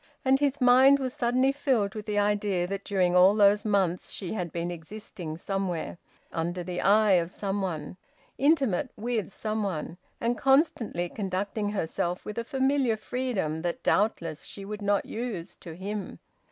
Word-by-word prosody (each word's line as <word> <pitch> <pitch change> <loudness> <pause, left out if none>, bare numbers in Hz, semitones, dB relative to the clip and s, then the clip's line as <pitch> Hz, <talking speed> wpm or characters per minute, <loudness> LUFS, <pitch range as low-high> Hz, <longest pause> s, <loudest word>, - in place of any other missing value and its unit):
And 265 +1 +4
his 285 0 +1
mind 260 +2 +7
was 260 -2 -3
suddenly 255 +2 +2
filled 255 -8 0
with 215 -1 -7
the 210 -1 -1
idea 205 -3 +1
that 195 +2 -4
during 185 -3 +1
all 185 +3 +7
those 205 0 +5
months 195 -4 0
she 190 -1 -4
had 180 -6 -3
been 170 +1 -3
existing 170 -1 -7
somewhere, 185 -2 -3 0.3
under 175 +2 -2
the 180 0 -4
eye 210 +1 +4
of 165 - -5
some 195 +1 -3
one, 165 -3 -4 0.4
intimate 275 - +2
with 230 -1 -2
some 215 +2 -3
one, 175 -3 -4 0.2
and 235 +1 -1
constantly 265 - +2
conducting 200 +2 -3
herself 175 -2 -2
with 210 +2 -4
a - - -2
familiar 265 -2 +1
freedom 215 -11 -2
that 170 0 -3
doubtless 170 -7 0
she 195 - -8
would 210 +1 -6
not 200 0 +1
use 220 -8 -5
to 165 -2 -10
him. 200 +3 -5
205 Hz, 165 wpm, -27 LUFS, 180-235 Hz, 0.4 s, mind